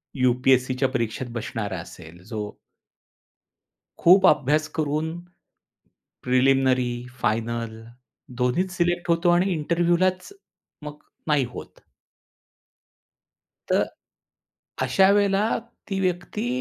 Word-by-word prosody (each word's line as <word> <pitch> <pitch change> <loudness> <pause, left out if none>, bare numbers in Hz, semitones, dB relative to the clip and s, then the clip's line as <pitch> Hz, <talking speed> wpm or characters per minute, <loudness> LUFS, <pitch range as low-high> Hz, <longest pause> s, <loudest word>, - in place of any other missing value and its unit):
यू-पी-एस-सीच्या 130 +1 +2
परीक्षेत 120 0 -3
बसणारा 105 -4 -4
असेल, 85 0 -12
जो 105 -2 -6 1.4
खूप 185 +3 +6
अभ्यास 150 +2 +3
करून, 155 +1 -1 1.1
प्रिलिमिनरी 130 0 +3 0.2
आणि 125 - -11
फायनल 115 0 -1 0.7
दोन्हीत 175 +10 +1
सिलेक्ट 175 0 0
होतो. 170 +1 +3
आणि 180 +2 +3
इंटरव्ह्यूलाच 175 - 0 0.5
मात्र 150 0 -10 0.2
नाही 145 -4 +2
होत. - - -10 1.9
तर - - +3 1.0
अशा 190 +10 +4
वेळेला 205 +1 +2 0.4
ती 195 0 -1
व्यक्ती 185 +5 -2
145 Hz, 85 wpm, -24 LUFS, 125-175 Hz, 1.9 s, खूप